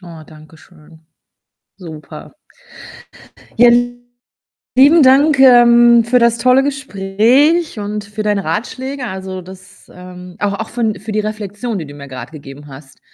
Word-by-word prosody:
Oh, 170 -3 -13
danke 155 0 -17
schön. 160 -1 -21 0.8
Super. 160 -5 -12 1.3
Ja, 240 +1 +6 1.1
lieben 290 +5 +5
Dank, 280 +3 +4
ähm, 240 -2 +5
für 245 +2 +2
das 235 -1 +1
tolle 255 +2 +3
Gespräch 270 - 0
und 210 0 -5
für 205 +1 -7
deine 205 -2 -2
Ratschläge. 255 - -5
Also, 190 -2 -7
das, 185 +1 -16
ähm 180 0 -13
auch 205 -1 -2
auch 225 - -5
für 240 +1 -5
'n 215 -4 -2
für 215 +2 -7
die 215 - -1
Reflexion, 210 +1 -5
die 160 - -7
du 145 - -12
mir 140 -1 -12
grad 130 -1 -9
gegeben 145 -1 -12
hast. 135 0 -15
210 Hz, 145 wpm, -15 LUFS, 180-245 Hz, 1.3 s, Ja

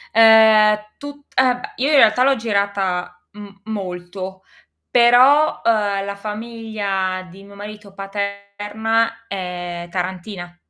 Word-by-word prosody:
Ehm, 220 -1 +7
è 210 0 -15
tut 285 0 -10
eh 255 -1 +3
b - - -13 0.2
Io 270 +4 0
in 305 - +3
realtà 230 -1 +5
l'ho 275 +1 +3
girata 200 -5 -2
m 210 0 -11 0.2
molto, 190 -2 -7 0.5
però, 255 +5 +5
uhm, 205 -3 +1
la 200 0 -5
famiglia 210 -3 -4
di 195 +2 -14
mio 200 0 -15
marito 205 0 -10
paterna 205 +3 -3
è 175 -3 -6
tarantina. 180 0 -5
205 Hz, 125 wpm, -19 LUFS, 190-225 Hz, 0.5 s, Ehm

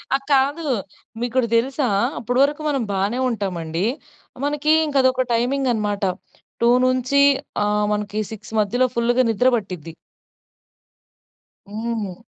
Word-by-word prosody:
ఆహ్, 275 - -2
కాదు. 280 +4 +2 0.6
మీకోటి 245 0 0
దెలుసా? 260 +3 +1 0.3
అప్పడి 245 +2 -1
వరకు 295 +2 0
మనం 275 -3 0
బానే 200 +5 -1
ఉంటామండి. 180 -5 -2 0.6
మనకి 295 +1 +1
ఇంక 290 -2 -5
అదొక 260 0 +2
టైమింగ్ 260 +3 +1
అన్నమాట. 210 -2 -2 0.6
2 235 - +4 0.2
నుంచి 255 +2 +2 0.4
ఆహ్, 210 0 +1
మనకి 210 +1 -2
6 220 0 -10
మధ్యలో 245 +5 +1
ఫుల్లుగా 240 +2 +2
నిద్ర 245 +4 +2
పట్టిద్ది. 180 -6 -7 1.8
హ్మ్. 220 -2 -4
235 Hz, 115 wpm, -21 LUFS, 210-260 Hz, 1.8 s, 2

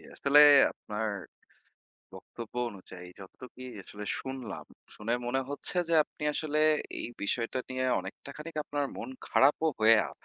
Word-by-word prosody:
আসলে 145 +1 +5 0.3
আপনার 105 +1 -5 1.1
বক্তব্য 115 -1 -10 0.2
অনুযায়ী 95 -2 -11
যতটুকুই 125 +6 -11 0.2
আসলে 105 +2 -9
শুনলাম, 130 -6 -6 0.3
শুনে 115 +3 -1
মনে 130 +2 0
হচ্ছে 145 +5 0
যে - - -1
আপনি - - -15
আসলে 155 0 -1 0.4
এই - - -4
বিষয়টা 115 +4 -1
নিয়ে 130 0 -2 0.2
অনেকটা 95 +8 -9
খানিক 155 +1 -9
আপনার 145 0 -2
মন 115 - -6 0.2
খারাপও 150 +4 +4
হয়ে 110 +1 +6
আ - - -10
125 Hz, 135 wpm, -30 LUFS, 105-145 Hz, 1.1 s, হয়ে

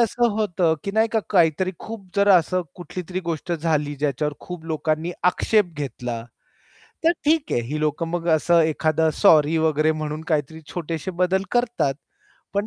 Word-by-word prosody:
असं 235 +1 +2
होतं 175 -6 +1
की 200 - -2
नाही 220 +1 +3
का 220 - +2
काहीतरी 180 -1 +3
खूप 225 -3 -8
जरा 200 0 +6
असं 180 +2 -1
कुठलीतरी 180 +1 -6
गोष्ट 170 0 -4
झाली, 155 -3 0
ज्याच्यावर 145 +1 -1
खूप 180 -2 -8
लोकांनी 160 +1 -1 0.2
आक्षेप 205 -1 +1
घेतला. 125 -4 -4 0.8
तर 330 - +6
ठीक 305 0 +2
आहे. - - +2
ही 140 +6 -4
लोकं 155 +2 -1
मग 170 0 -3
असं 170 +2 +3
एखादं 160 0 +2
सॉरी 160 -5 +5
वगैरे 155 0 +2
म्हणून 155 0 -4
काहीतरी 155 +1 -1
छोटेसे 165 +1 -3
बदल 190 +1 +2
करतात. 240 - +1 0.6
पण 200 +1 0
165 Hz, 155 wpm, -23 LUFS, 155-190 Hz, 0.8 s, जरा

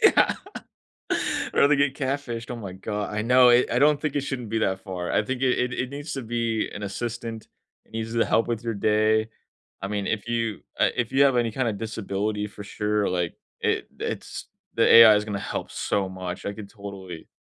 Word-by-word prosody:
Yeah. - - +5 1.2
Or - - +6
they 150 - +4
get 140 -1 +2
catfished. 130 -4 -3
Oh, 120 - -3
my 100 -5 -7
go 105 +2 -4
I 105 +1 -2
know, 125 +2 +6
it 120 +1 +5
I 120 - +2
don't 145 +2 +5
think 150 -2 -2
it 145 - +2
shouldn't 125 -6 -4
be 115 - 0
that 95 -3 0
far, 90 -3 -5
I - - +3
think 130 +2 -3
it 130 -1 +3
it 125 0 0
it 125 0 -2
needs 145 +2 -6
to 135 - -4
be 115 -1 -1
an 105 - -6
assistant, 115 +2 -5 0.4
it - - -27
needs 110 0 -4
to 115 - +3
help 115 - +2
with 115 -1 -2
your 115 -1 -1
day. 110 +1 +2 0.5
I 95 - -1
mean, 100 -1 -2
if 110 0 -2
you, 115 -3 -1 0.2
uh, - - +5
if 120 -2 -1
you 135 +1 +4
have 135 -3 +4
any 120 -2 +2
kinda 120 -3 0
disability 105 -1 -3
for 105 - -10
sure, 105 0 0
like, 90 -2 -1 0.3
it - - 0
it's - - -5 0.3
the - - +4
AI 115 -2 +10
is 105 - 0
gonna 105 -2 -3
help - - -4
so 100 -2 -1
much, 95 -1 -6
I 100 - -1
could 105 -2 -9
totally 95 -5 -9
110 Hz, 215 wpm, -25 LUFS, 105-125 Hz, 1.2 s, AI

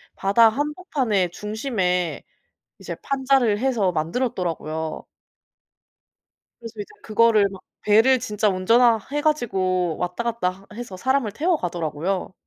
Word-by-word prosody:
바다 220 +4 +4
한복판에 275 - -1
중심에 195 -4 -2 0.6
이제 - - -6
판자를 265 -6 +1
해서 235 -8 +1
만들었더라구요. 160 -3 -3 1.5
그래서 230 -1 -9
이제 205 - -4 0.2
그거를 215 -2 +4
막 190 -1 -11 0.2
배를 225 +5 +4
진짜 215 -3 0
운전하 225 +5 +4
해 295 0 -1
가지고 185 - 0
왔다갔다 190 0 -2
해 225 - -9
해서 200 -6 -7
사람을 260 0 0
태워 335 - +1
가더라구요. 175 - -3
210 Hz, 290 characters per minute, -23 LUFS, 185-250 Hz, 1.5 s, 바다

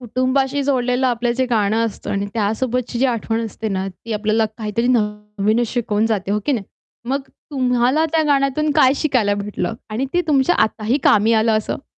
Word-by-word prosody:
कुटुंबाशी 260 +3 0
जोडलेलं 255 -1 +1
आपलं 240 -1 0
जे 260 - +3
गाणं 220 +1 +2
असतं 210 -1 -7
आणि 200 0 -1
त्यासोबतची 235 +3 -1
जी 265 - +2
आठवण 225 0 -2
असते 220 0 -5
ना, 190 -1 -2
ती 225 +4 -9
आपल्याला 215 +1 +1
काहीतरी 220 +2 -1
नवीनच 210 +1 -1
शिकवून 220 -3 0
जाते 195 -1 -2
हो 210 +1 +1
की 290 - +2
नाही? 220 -6 -2 0.4
मग 275 +1 0
तुम्हाला 255 +1 0
त्या 320 -1 +3
गाण्यातून 285 +1 +1
काय 260 0 +6
शिकायला 245 -9 +1
भेटलं 210 +2 -3 0.2
आणि 245 +6 -2
ते 355 - +3
तुमच्या 290 +3 +3
आताही 225 +7 -1
कामी 215 +2 +4
आलं 225 -1 +2
असं. 245 +5 -5
230 Hz, 175 wpm, -19 LUFS, 215-260 Hz, 0.4 s, काय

